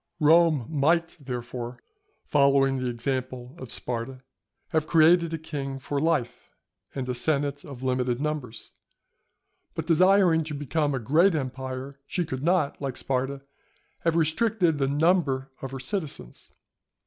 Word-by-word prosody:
Rome 160 -4 +5
might, 165 +3 +1
therefore, 125 -2 -6 0.5
following 140 -2 +3
the 130 - -2
example 125 +1 -3
of 130 -3 -8
Sparta, 125 +2 -5 0.5
have 155 -1 0
created 170 +1 +5
a 165 - -2
king 140 -3 -5
for 140 +2 -3
life 150 -6 -1 0.5
and 130 -2 -3
a 125 - -1
senate 145 +2 0
of 135 -3 -10
limited 125 -1 0
numbers, 145 -6 -4 1.0
but - - -3
desiring 180 -1 +4
to 150 -1 -5
become 145 0 -1
a - - -1
great 160 - +3
empire, 130 0 -5
she 175 - -1
could 130 -4 -5
not, 165 -3 +1
like 135 -3 -3
Sparta, 135 +1 -2 0.6
have 165 -1 0
restricted 170 0 +2
the 135 - +2
number 140 -3 +1
of 135 - -4
her 135 0 -6
citizens. 140 - -5
140 Hz, 135 wpm, -26 LUFS, 130-160 Hz, 1.0 s, Rome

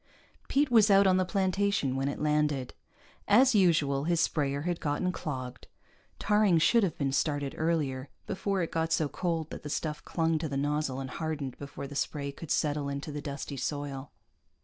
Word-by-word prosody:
Pete 280 -1 +2
was 220 -3 +6
out 200 0 +6
on 185 -1 +4
the 185 - +2
plantation 190 -6 0
when 135 +1 -1
it 140 - -3
landed. 150 -3 0 0.5
As 250 +5 +6
usual, 150 -8 +3
his 170 0 +1
sprayer 140 -3 0
had 175 0 -2
gotten 150 +5 -1
clogged; 130 -7 -6 0.5
tarring 210 -4 +3
should 230 +8 +4
have 190 -6 -1
been 140 -2 0
started 145 0 0
earlier, 145 -5 -1 0.2
before 195 -1 -1
it 165 - -4
got 165 0 -1
so 155 -2 +2
cold 165 0 -2
that - - -7
the 150 - -7
stuff 150 0 -3
clung 165 -1 0
to 155 - -3
the 140 - -2
nozzle 145 -1 -1
and 130 -1 -5
hardened 150 -5 -4
before 140 0 -7
the 140 - -8
spray 140 0 -2
could 155 +2 -10
settle 145 -1 0
into 140 +2 -4
the 145 0 -5
dusty 140 0 -5
soil. 140 0 -4
150 Hz, 185 wpm, -29 LUFS, 140-175 Hz, 0.5 s, was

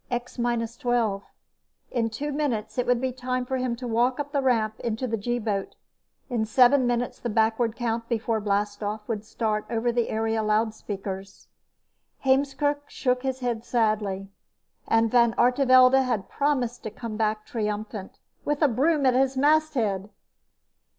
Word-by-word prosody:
X 245 0 -4
minus 235 -1 -1
twelve. 235 -6 0 0.7
In 230 -2 0
two 285 +7 -4
minutes, 245 -7 -2
it 250 - 0
would 245 -1 +3
be 260 +1 -1
time 255 0 -3
for 260 +1 -2
him 250 -2 -1
to 245 +1 -6
walk 240 +3 +1
up 290 0 -3
the 280 - +1
ramp 225 -5 +1
into 230 +2 -2
the 230 -2 -1
G 240 +3 -2
boat. 210 -4 -3 0.5
In 240 -4 -1
seven 250 +4 +4
minutes 245 0 -1
the 240 - -3
backward 225 +1 +1
count 230 -1 -2
before 225 -1 0
blastoff 205 +1 -2
would 215 -3 -3
start 215 -1 -2
over 235 +1 0
the 235 -1 0
area 225 0 0
loudspeakers. 210 -3 -3 0.8
Heemskerk 285 +2 +1
shook 250 -1 0
his 265 -1 -3
head 235 -2 -2
sadly. 210 -5 0 0.6
And 225 0 +3
Van 235 -2 +4
Artevelde 255 +1 +5
had 225 -7 -2
promised 260 -4 0
to - - -5
come 225 0 -7
back 215 -1 -1
triumphant, 210 -2 -4 0.3
with 295 +1 0
a - - +7
broom 280 +4 +2
at 255 - +5
his 265 +1 +2
masthead! 265 -10 +2
235 Hz, 155 wpm, -26 LUFS, 215-255 Hz, 0.8 s, a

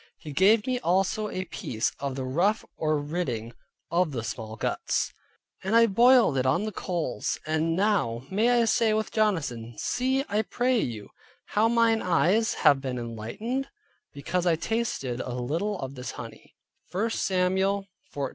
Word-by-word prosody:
He 150 - -9
gave 205 +7 +4
me 255 -1 0
also 195 +1 +1
a 185 -1 -4
piece 115 -9 -2
of 140 -2 -3
the 135 - -3
ruff 175 +11 +1
or 155 -1 0
ridding 145 -7 -3 0.4
of 170 -3 +1
the 115 -3 -3
small 110 -1 -5
guts, - - -1 0.5
and 195 +4 0
I 230 0 +7
broiled 235 - +5
it 130 - 0
on 170 +10 +2
the 215 - -3
coals; 170 - -2
and 160 +1 0
now 175 - +1
may 215 +5 +3
I 240 -1 +4
say 225 -1 +3
with 220 0 -1
Jonathan, 140 - -1
"See, 265 +2 0
I 215 -5 +1
pray 245 +3 +1
you, 110 - -4 0.4
how 215 +2 +3
mine 230 -1 +3
eyes 185 +6 +2
have 140 -2 +6
been 130 -2 -3
enlightened, 120 - -4 0.4
because 175 +6 -2
I 170 - +4
tasted 160 - -2
a 125 - -5
little 165 +12 -2
of 135 0 -5
this 125 -2 -6
honey" - - -10 0.4
(1 220 +5 0
Samuel 190 +1 +1 0.3
14.29). 140 -2 -3
180 Hz, 165 wpm, -27 LUFS, 135-220 Hz, 0.5 s, I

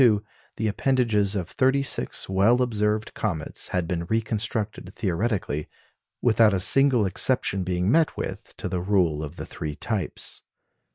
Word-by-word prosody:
In 120 -3 +7
1882 105 +1 -8
the - - +2
appendages 105 -3 +1
of 90 -4 -2
thirty 135 +6 +2
six 135 - -1
well 100 +6 +3
observed 105 -2 -1
comets 85 -8 -3
had 90 -2 -1
been 85 -1 -2
reconstructed 110 -2 -2
theoretically, 95 -5 -1 0.6
without 110 -3 +4
a - - 0
single 130 +2 +4
exception 100 -1 +1
being 90 +2 0
met 160 +2 +2
with - - -6
to - - -4
the 90 -1 -2
rule 90 -6 +1
of 75 +2 -7
the - - -6
three 75 -1 -6
types. 105 -1 -3
105 Hz, 155 wpm, -25 LUFS, 90-115 Hz, 0.6 s, In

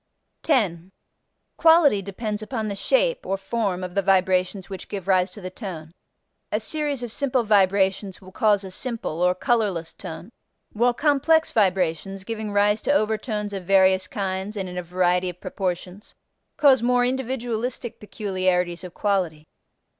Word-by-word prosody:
10. 190 - 0 0.7
Quality 320 -10 +5
depends 210 +2 -4
upon 215 -1 -3
the - - -2
shape - - +1
(or 195 - -2
form) 195 -2 -2
of 180 -1 -5
the 200 - +1
vibrations 185 0 +1
which 190 -2 -7
give 195 -2 -6
rise 185 -1 +3
to - - -12
the 185 -2 -7
tone. 175 -7 -7 0.6
A - - +1
series 295 -5 -2
of 240 - -5
simple 260 -1 0
vibrations 195 -2 +2
will 185 -1 -14
cause 205 0 +2
a 190 - -8
simple 225 -6 -4
(or 180 0 +3
colorless) 200 -8 0
tone, 165 +6 -9 0.4
while 240 +3 +2
complex 315 +3 +3
vibrations 190 -1 0
(giving 220 0 -4
rise 205 +1 +2
to - - 0
overtones 215 -4 -1
of 190 -2 -5
various 190 0 +4
kinds 195 +1 -3
and 190 -2 -3
in 180 - -8
a 180 - -2
variety 180 +1 +1
of 180 0 -9
proportions) 185 +1 -5 0.4
cause 270 -4 +5
more 245 +1 +3
individualistic 245 -2 -3
peculiarities 185 -3 -1
of 180 -1 -9
quality. 180 -7 -1
200 Hz, 155 wpm, -24 LUFS, 185-230 Hz, 0.7 s, Quality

